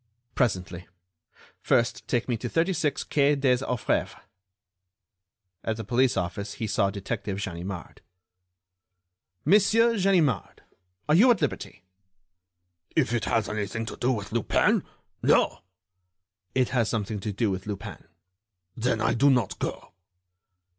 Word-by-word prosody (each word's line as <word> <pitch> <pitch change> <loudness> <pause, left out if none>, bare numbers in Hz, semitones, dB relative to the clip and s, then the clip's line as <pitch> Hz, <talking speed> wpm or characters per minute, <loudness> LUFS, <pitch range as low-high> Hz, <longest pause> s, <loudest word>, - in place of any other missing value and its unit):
"Presently. 90 -7 -1 0.7
First 120 -1 +1
take 120 -1 0
me 120 - 0
to 120 +2 -5
36 165 -3 0
quai 145 0 +2
des 135 -3 +3
Orfèvres." 125 -3 -1 1.4
At 110 -1 -2
the 110 - -5
police 125 +3 +2
office 100 +3 -3
he 115 - -3
saw 100 -2 +1
Detective 100 0 -4
Ganimard. 90 -1 -6 1.4
"Monsieur 225 +3 +4
Ganimard, 170 - +1 0.4
are 150 - +3
you 215 +11 +6
at 235 -6 +4
liberty?" 140 - -3 1.1
"If 135 -7 +2
it 120 -3 0
has 115 -2 +1
anything 110 +1 -3
to - - -6
do 125 - 0
with 105 -5 -4
Lupin—no!" 115 -1 +1 1.0
"It 130 -2 +2
has 120 -4 +1
something 105 -1 -2
to 105 +2 -3
do 105 +1 0
with 95 +2 -5
Lupin." 105 -3 -6 0.7
"Then 115 -1 0
I 115 - +2
do 140 +5 +4
not 125 -7 +1
go." - - -5
115 Hz, 125 wpm, -26 LUFS, 100-140 Hz, 1.4 s, you